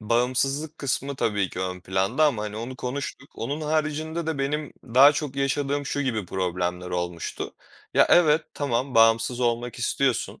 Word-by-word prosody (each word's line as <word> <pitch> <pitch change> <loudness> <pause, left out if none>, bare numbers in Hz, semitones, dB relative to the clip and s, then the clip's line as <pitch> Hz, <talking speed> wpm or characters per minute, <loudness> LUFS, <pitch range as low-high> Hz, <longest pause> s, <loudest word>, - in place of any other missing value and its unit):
bağımsızlık 130 +7 0
kısmı 140 0 -2
tabii 105 -6 0
ki 90 - -5
ön 90 -1 -3
planda 95 - +1
ama, 120 -8 +1
hani, 105 0 -5
onu 125 +3 -6
konuştuk. 135 +1 -5
Onun 145 +7 -4
haricinde 155 +1 -1
de 160 -3 -2
benim 145 +2 -2
daha 130 +4 +7
çok 145 -2 -4
yaşadığım 140 +1 0
şu 145 - -2
gibi 115 -8 -1
problemler 90 -1 -2
olmuştu. 90 -1 -4 0.4
Ya, - - +6
evet, 160 -2 +5
tamam, 130 -2 -1
bağımsız 115 +2 +4
olmak 120 0 -1
istiyorsun. 130 +1 0
130 Hz, 155 wpm, -25 LUFS, 110-145 Hz, 0.4 s, daha